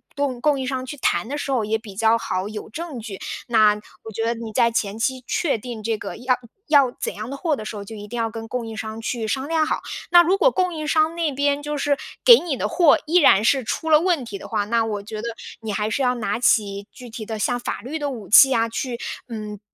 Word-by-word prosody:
供 275 -4 -2
供 290 0 +2
应 260 - -2
商 255 0 -2
去 290 +3 -7
谈 255 - 0
的 285 +4 -3
时 285 - -3
候 250 -4 +1
也 215 +1 0
比 215 -3 -12
较 225 +2 +3
好 185 -4 -3
有 215 0 -7
证 315 -2 -6
据。 215 -4 -7 0.3
那 215 -3 +5 0.3
我 220 - -8
觉 225 +2 -2
得 230 - +1
你 230 -1 -7
在 235 +1 +3
前 215 -2 -1
期 255 +2 -1
确 305 -9 0
定 230 -1 -7
这 225 +1 0
个 - - -7
要 250 +2 +1 0.3
要 280 -4 +5
怎 - - -3
样 215 +3 -7
的 275 - -5
货 320 -1 0
的 215 - -7
时 215 - -6
候， 205 - -6
就 220 - -9
一 205 -1 -9
定 240 +3 -6
要 225 -1 -1
跟 225 -1 -7
供 240 +1 -3
应 225 -1 -7
商 220 0 -6
去 225 -1 -3
商 265 +4 -2
量 320 0 +2
好。 - - -1 0.3
那 345 0 +8
如 365 +3 +2
果 - - +6
供 365 -6 0
应 310 -1 -4
商 315 +1 +2
那 330 -3 0
边 285 +1 +1
就 295 0 -3
是 285 0 +1 0.3
给 475 -2 +9
你 320 -6 -3
的 - - -1
货 335 -6 +5
依 330 +4 +3
然 215 - +6
是 265 +3 +3
出 320 +7 -3
了 305 - +7
问 335 -6 +1
题 205 -4 -7
的 - - -9
话， 205 - -1
那 230 +2 +1
我 210 -2 -3
觉 215 +1 -6
得 235 - -4 0.3
你 220 -1 -4
还 210 +1 -1
是 275 - -1
要 250 -1 +2
拿 220 -2 -2
起 205 -4 +1
具 245 -2 -12
体 220 -1 -7
的 220 - -4
像 245 +3 0
法 240 - -4
律 290 +7 -5
的 290 -1 -2
武 230 -7 -7
器 265 +6 +8
啊， 230 0 +2
去 240 +1 -3 0.3
嗯， 215 -3 -6
240 Hz, 285 characters per minute, -22 LUFS, 220-285 Hz, 0.3 s, 给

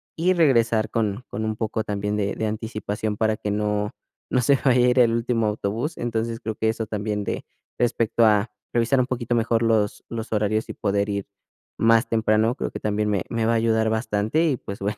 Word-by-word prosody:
y 175 +3 +2
regresar 115 -9 +3
con 110 +1 -1
con 110 +2 -4
un 110 0 -2
poco, 110 0 -2
también, 105 -1 -2
de 100 -1 -1
de 110 - -2
anticipación 110 -1 -3
para 110 0 +1
que 105 -1 -4
no 105 0 -1 0.4
no 125 - +3
se 135 +3 +3
vaya 125 -2 +4
a - - +5
ir 125 - +2
el 115 -2 +5
último 115 -1 0
autobús. 110 +8 -2
Entonces, 115 -1 -2
creo 110 -1 -4
que 110 +1 0
eso 110 0 -2
también 105 -1 -3
de - - -4 0.3
respecto 115 -1 +2
a 105 +1 +2 0.2
revisar 120 +3 +2
un 125 - +2
poquito 120 -2 -2
mejor 115 0 +1
los 110 -2 +1
los 115 -1 -6
horarios 110 0 0
y - - -4
poder 100 0 0
ir 100 -1 -2 0.5
más 115 +2 +4
temprano, 110 0 +2
creo - - -3
que - - -7
también 105 0 -1
me 100 -4 0
me 115 -1 -1
va 115 - +3
a - - +2
ayudar 110 -1 +2
bastante. 110 +7 0
Y 140 -6 +1
pues 100 - -8
bueno, 100 +2 -2
110 Hz, 210 wpm, -24 LUFS, 105-115 Hz, 0.5 s, a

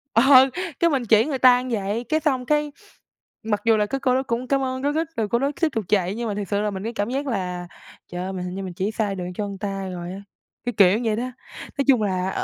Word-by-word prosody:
Ờ, 265 +2 +7 0.3
cái 340 - +4
mình 265 -5 0
chỉ 220 0 +5
người 280 -3 -2
ta 250 -1 +6
như 255 0 -4
vậy, 210 +1 -2
cái 310 - +2
xong 265 -5 0
cái 300 0 +1 0.7
mặc 210 -2 -1
dù 225 -1 +5
là 210 - +2
cái 270 +6 -3
cô 255 -1 +2
đó 265 - +1
cũng 245 0 -3
cám 275 0 +1
ơn 260 0 -2
rối 290 +1 0
rít 320 0 0
rồi 220 -2 0
cô 235 - +2
đó 280 +2 0
tiếp 330 - +4
tục 220 -4 -2
chạy 195 -1 +1
nhưng 235 0 -3
mà 205 - -2
thiệt 205 -1 -4
sự 205 0 0
là 210 0 -1
mình, 190 0 -5
cái 230 +2 -4
cảm 205 +1 -2
giác 275 +2 -2
là, 180 -6 -3 0.4
trời 175 +1 -4
ơi, 190 +1 -4
mình 180 -1 -4
hình 180 +1 -5
như 195 - -4
mình 185 -2 -6
chỉ 195 +5 -2
sai 210 -3 -1
đường 180 -1 -5
cho 205 +2 -3
người 200 -1 -6
ta 195 -1 -4
rồi 175 0 -6
á, 195 +2 -7 0.4
cái 245 - -1
kiểu 200 +2 +6
vậy 215 -1 +1
đó. 235 - -2 0.5
Nói 275 - +1
chung 255 -5 +5
là, 190 -2 0
220 Hz, 285 wpm, -23 LUFS, 195-260 Hz, 0.7 s, Ờ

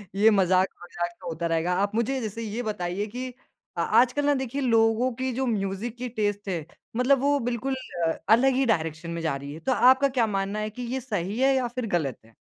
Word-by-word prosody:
ये 210 +3 +6
मज़ाक-वज़ाक 185 -2 +1
तो 175 - -8
होता 170 +1 -2
रहेगा। 165 +2 0
आप 200 +1 -1
मुझे, 235 +4 0
जैसे 220 +1 -4
ये 225 +2 -4
बताइए 200 -2 -2
कि 250 +4 -5 0.5
अ - - +1
आजकल 255 +4 +3
ना 290 - +4
देखिए, 265 +1 -3
लोगों 230 0 +3
की 260 +2 -2
जो 265 +2 -1
म्यूज़िक 210 0 -2
की 250 0 -4
टेस्ट 205 -3 -2
है, 165 -5 -2 0.3
मतलब 250 +3 +3
वो 285 +1 +3
बिल्कुल 245 +2 -2 0.3
अ, - - +2 0.2
अलग 255 +4 +5
ही 270 0 +2
डायरेक्शन 165 -5 -1
में 170 0 -4
जा 160 -4 0
रही 140 +1 -7
है। 160 - -8
तो 265 - -1
आपका 260 +2 +5
क्या 245 -4 +1
मानना 200 +1 -2
है 215 - -2
कि 250 +4 -9
ये 265 - -1
सही 205 -4 -3
है 270 +1 +4
या 255 -2 +1
फिर 245 0 -4
गलत 140 -7 -3
है? - - -19
220 Hz, 220 wpm, -26 LUFS, 185-255 Hz, 0.5 s, ये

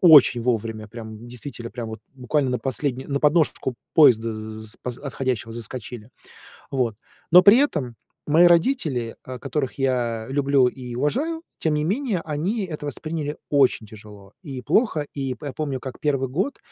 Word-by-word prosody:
очень 150 -8 +8
вовремя. 115 -2 -2
Прямо 110 0 -8
действительно, 120 +1 -8
прямо 115 -3 -6
вот 110 -1 -7
буквально 130 +1 0
на 125 - 0
последню 135 -1 -3
на 140 -1 -1
подножечку 150 -4 +2 0.2
поезда 115 -7 +5
з 110 0 -8
поз 125 -1 -5
отходящего 130 -5 -3
заскочили. 120 0 -7 0.6
Вот. 125 -5 0 0.4
Но 180 +1 +10
при 205 +6 +8
этом 145 - 0 0.3
мои 160 +4 +5
родители, 165 - +2
э, 130 -1 -6
которых 135 +1 -3
я 120 -4 0
люблю 140 -2 +3
и 125 -1 -7
уважаю, 285 - -1 0.2
тем 155 -2 +1
не 150 - +1
менее, 210 - 0
они 175 +8 -1
это 150 -3 -6
восприняли 150 +1 -4
очень 135 -5 +3
тяжело 105 -2 -13
и 135 -4 -6
плохо. 160 - +2
И 135 -2 -3
п 140 +1 -7
помню, 140 -4 -3
как 130 -2 -7
1 135 -4 0
год 190 - -1
135 Hz, 160 wpm, -23 LUFS, 120-150 Hz, 0.6 s, Но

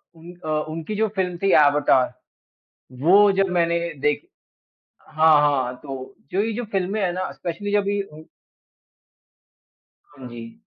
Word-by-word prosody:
उन 165 +2 -12
अ 155 - -4 0.2
उनकी 165 +6 -5
जो 220 +1 +1
फ़िल्म 180 -2 -1
थी 195 - +3
एवाटार 145 -4 +4 0.9
वो 200 +6 +6
जब 195 -1 +2
मैंने 170 0 +1 0.2
देखी 150 +1 -1 0.8
हाँ, 155 -1 +5
हाँ। 135 -4 +1
तो 135 -3 -8 0.2
जो 190 - +1
ये 225 - -2
जो 240 +3 -4
फ़िल्में 195 +2 -1
है 180 -2 0
ना 185 +1 -3
स्पेशली 190 +4 -5
जब 205 -1 +1
ये 205 0 0
हुँ। 155 +1 -12 1.8
हाँ 135 -3 -13
जी। 115 -1 -10
170 Hz, 145 wpm, -22 LUFS, 145-195 Hz, 1.8 s, वो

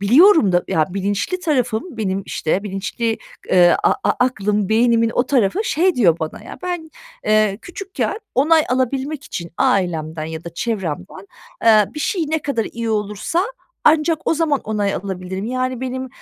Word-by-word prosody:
biliyorum 255 - +6
da. 175 0 +2
Ya, 155 - +2
bilinçli 200 - -2
tarafım, 275 -3 -1
benim, 195 -3 -1
işte, 180 +5 -1
bilinçli, 210 +3 -2 0.3
eee, 175 -1 +6
a - - +4
a - - +4
aklım, 210 -4 0
beynimin 230 0 +3
o 245 - +2
tarafı 260 - +2
şey 355 +2 +2
diyor 175 -9 +3
bana: 160 -1 -5
"Ya, - - -9
ben, 350 -3 -4 0.3
eee, 215 -2 +2
küçükken 390 +3 -4 0.2
onay 310 +4 +4
alabilmek 265 +3 -1
için 170 -1 -6
ailemden 160 -4 0
ya 160 0 -6
da 170 -1 -8
çevremden, 185 -3 -4 0.4
eee, 215 -2 +6
bir 300 - -5
şey 345 +1 0
ne 315 +1 +1
kadar 275 -7 -2
iyi 230 0 -4
olursa 210 - -1 0.4
ancak 315 +1 +4
o - - +2
zaman 315 -3 +1
onay 205 -2 -1
alabilirim." 190 0 -5
Yani 255 0 -2
benim, 260 0 -4
225 Hz, 160 wpm, -20 LUFS, 195-285 Hz, 0.4 s, biliyorum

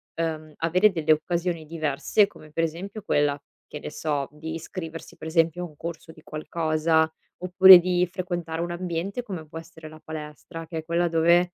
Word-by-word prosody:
uhm, 160 -2 -3
avere 180 +6 +3
delle 160 -3 +3
occasioni 170 +1 -2
diverse 155 +6 +1
come 155 -6 -16
per 165 +2 0
esempio 195 +7 -6
quella, 145 -4 +1 0.2
che 150 - -8
ne - - -6
so, 145 -2 -2
di 160 +2 -7
iscriversi 165 0 -7
per 160 - -8
esempio 165 +1 +1
a - - -4
un 155 - -18
corso 165 +1 -7
di 160 -1 -17
qualcosa, 160 0 0 0.3
oppure 185 +1 +9
di 180 0 +1
frequentare 175 -3 -3
un 175 - -2
ambiente 180 +6 -3
come 180 -9 -7
può 160 - -9
essere 160 -1 -10
la 155 0 -13
palestra, 160 +2 -8
che 165 0 -6
è 160 - -9
quella 170 +1 +1
dove, 170 +2 +3
165 Hz, 180 wpm, -25 LUFS, 155-175 Hz, 0.3 s, oppure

